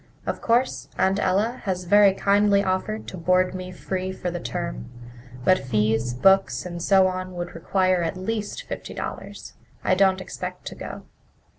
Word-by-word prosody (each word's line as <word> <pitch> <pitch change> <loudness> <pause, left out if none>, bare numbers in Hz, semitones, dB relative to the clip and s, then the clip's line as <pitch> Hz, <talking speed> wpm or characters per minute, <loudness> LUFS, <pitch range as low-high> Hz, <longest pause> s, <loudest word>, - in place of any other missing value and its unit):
Of - - -3
course, 240 +3 +1
Aunt 190 +1 +2
Ella 210 +7 +1
has 185 -2 -1
very 200 +2 +6
kindly 200 0 +3
offered 190 +3 -2
to 185 - -7
board 185 +2 +2
me 185 0 -6
free 185 0 -4
for 180 -1 -4
the 175 - -4
term, - - -5 0.6
but 185 - +5
fees, 110 0 0
books, 195 +9 +3
and 175 -1 -6
so 190 +1 +5
on 185 0 -3
would 175 0 -5
require 185 +2 +1
at 165 +2 -2
least 210 +2 -3
fifty - - -7
dollars. - - -7 0.3
I - - +3
don't 190 0 +3
expect 185 - -7
to - - -5
go." - - -8
185 Hz, 165 wpm, -24 LUFS, 175-195 Hz, 0.6 s, very